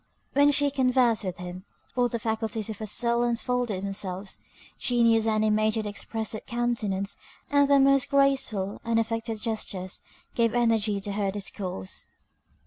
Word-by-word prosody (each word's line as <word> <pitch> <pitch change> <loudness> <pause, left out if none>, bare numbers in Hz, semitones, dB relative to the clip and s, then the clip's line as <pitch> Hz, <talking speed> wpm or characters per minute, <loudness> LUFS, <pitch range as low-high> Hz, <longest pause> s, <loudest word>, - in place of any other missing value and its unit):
When 285 +1 +5
she 285 0 +2
conversed 255 -4 +2
with 185 -2 -4
him, 180 +1 -7 0.3
all 245 -1 +3
the 235 - -2
faculties 220 -1 -2
of 210 - -8
her 215 - -4
soul 235 +3 +3
unfolded 240 -4 -1
themselves; 195 -1 -3 0.4
genius 230 -2 +3
animated 215 0 +2
her - - -2
expressive 220 +1 -3
countenance 225 -5 -1 0.3
and 285 -1 +5
the 280 -1 +6
most 275 0 +4
graceful, 270 -8 +1
unaffected 225 -1 -1
gestures 205 -4 -3 0.3
gave 230 0 +1
energy 225 -4 +2
to 205 - -4
her 200 -1 0
discourse. 190 - -4
225 Hz, 135 wpm, -27 LUFS, 205-240 Hz, 0.4 s, the